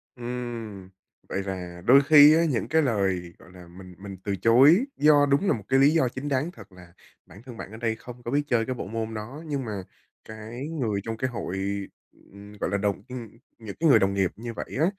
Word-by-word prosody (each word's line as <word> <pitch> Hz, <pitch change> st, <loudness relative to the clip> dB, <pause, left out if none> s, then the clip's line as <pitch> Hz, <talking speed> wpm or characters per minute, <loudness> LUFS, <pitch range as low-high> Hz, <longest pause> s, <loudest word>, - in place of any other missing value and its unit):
Ừm, 120 Hz, -5 st, -6 dB, 0.4 s
vậy 95 Hz, -, -2 dB
là 90 Hz, -2 st, -6 dB
đôi 135 Hz, +4 st, +7 dB
khi 150 Hz, 0 st, +8 dB
á 165 Hz, -, +3 dB
những 120 Hz, -, -1 dB
cái 160 Hz, 0 st, +2 dB
lời, 95 Hz, -, -1 dB
gọi -, -, -17 dB
là, 90 Hz, -1 st, -13 dB
mình 90 Hz, +1 st, -13 dB
mình 100 Hz, 0 st, -9 dB
từ 100 Hz, -, -2 dB
chối 135 Hz, -, +5 dB
do 145 Hz, -1 st, +5 dB
đúng 140 Hz, +7 st, +1 dB
là -, -, +4 dB
một 110 Hz, -, -5 dB
cái 135 Hz, 0 st, +3 dB
lý 140 Hz, +2 st, +6 dB
do 160 Hz, -5 st, +2 dB
chính 130 Hz, +4 st, -6 dB
đáng 140 Hz, +5 st, -1 dB
thật, 105 Hz, -, -15 dB
là 90 Hz, -2 st, -16 dB, 0.3 s
bản 95 Hz, +5 st, -15 dB
thân 125 Hz, -3 st, -11 dB
bạn 100 Hz, -, -8 dB
ở 110 Hz, -, -9 dB
đây 115 Hz, -1 st, -1 dB
không 120 Hz, +2 st, -12 dB
có 120 Hz, -, -5 dB
biết 145 Hz, -, +2 dB
chơi 115 Hz, -4 st, +1 dB
cái 130 Hz, -, -3 dB
bộ 115 Hz, -, -6 dB
môn 110 Hz, +1 st, -4 dB
đó. 120 Hz, +9 st, -7 dB
Nhưng 140 Hz, -5 st, -3 dB
mà 100 Hz, -3 st, -5 dB, 0.4 s
cái 110 Hz, +5 st, -8 dB
người 120 Hz, -11 st, -2 dB
trong 115 Hz, -1 st, -5 dB
cái 130 Hz, +3 st, -2 dB
hội, 105 Hz, -6 st, -5 dB, 0.7 s
ừm, 100 Hz, +1 st, -13 dB
gọi -, -, -2 dB
là, 100 Hz, -, 0 dB
đồng 100 Hz, -1 st, -1 dB
ừm, 120 Hz, -3 st, -7 dB, 0.3 s
những 110 Hz, -4 st, -9 dB
cái 165 Hz, 0 st, +3 dB
người -, -, +7 dB
đồng 95 Hz, 0 st, +1 dB
nghiệp 95 Hz, -3 st, +1 dB
như 115 Hz, +1 st, -7 dB
vậy -, -, -5 dB
á, 155 Hz, -, +4 dB
115 Hz, 235 wpm, -25 LUFS, 100-135 Hz, 0.7 s, khi